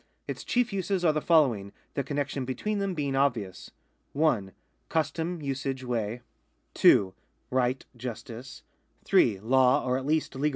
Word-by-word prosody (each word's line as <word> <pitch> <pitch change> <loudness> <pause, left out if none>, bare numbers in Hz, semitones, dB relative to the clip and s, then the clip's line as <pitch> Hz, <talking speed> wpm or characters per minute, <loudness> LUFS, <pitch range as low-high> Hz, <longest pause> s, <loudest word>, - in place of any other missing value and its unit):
Its - - -5
chief 240 -3 0
uses 190 -1 -1
are 155 - +5
the 155 - -1
following, 125 - +3 0.2
the 140 - -1
connexion 140 -1 -2
between 165 - -2
them 195 -2 -1
being 140 -3 -1
obvious: 120 -9 -1 0.4
(1) 135 -11 +1 0.4
custom, 160 +1 -1
usage, 135 -1 -3
way; 120 -1 -2 0.5
(2) 95 -2 +5 0.4
right, 130 0 0
justice; 120 +1 -8 0.4
(3) 100 -5 +4
law, 130 +3 +3
or 130 0 +1
at 135 - -7
least 155 0 +1
1 135 - -6
D. 150 - +3
135 Hz, 150 wpm, -28 LUFS, 120-155 Hz, 0.5 s, are